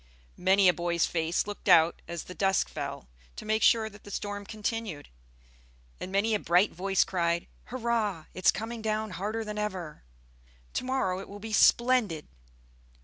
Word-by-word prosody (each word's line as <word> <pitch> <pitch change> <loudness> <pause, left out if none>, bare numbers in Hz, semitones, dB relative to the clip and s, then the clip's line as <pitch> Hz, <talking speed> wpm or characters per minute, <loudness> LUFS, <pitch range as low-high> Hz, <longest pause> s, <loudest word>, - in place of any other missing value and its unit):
Many 190 +1 +4
a 180 - +6
boy's 170 -1 0
face 165 0 0
looked 205 0 -5
out 165 -2 +5
as 170 -1 -5
the 180 - -9
dusk 195 +1 +1
fell, 60 - -6 0.3
to - - -8
make 215 +1 +1
sure 225 -1 +4
that 210 -1 -13
the - - -11
storm 205 0 -5
continued; 215 -7 -4 0.9
and 185 - -6
many 205 +3 +2
a 210 - +2
bright 180 +3 +3
voice 195 +2 +1
cried, 170 -2 0 0.2
"Hurrah! 225 -8 -1
It's 185 - +2
coming 225 +3 -2
down 215 -1 -1
harder 215 +5 -3
than 210 0 -4
ever! 185 -7 -4 0.7
To - - -2
morrow 255 -8 0
it 195 - -9
will 200 - -8
be 220 +1 -7
splendid!" 235 -9 +3
200 Hz, 165 wpm, -29 LUFS, 180-220 Hz, 0.9 s, a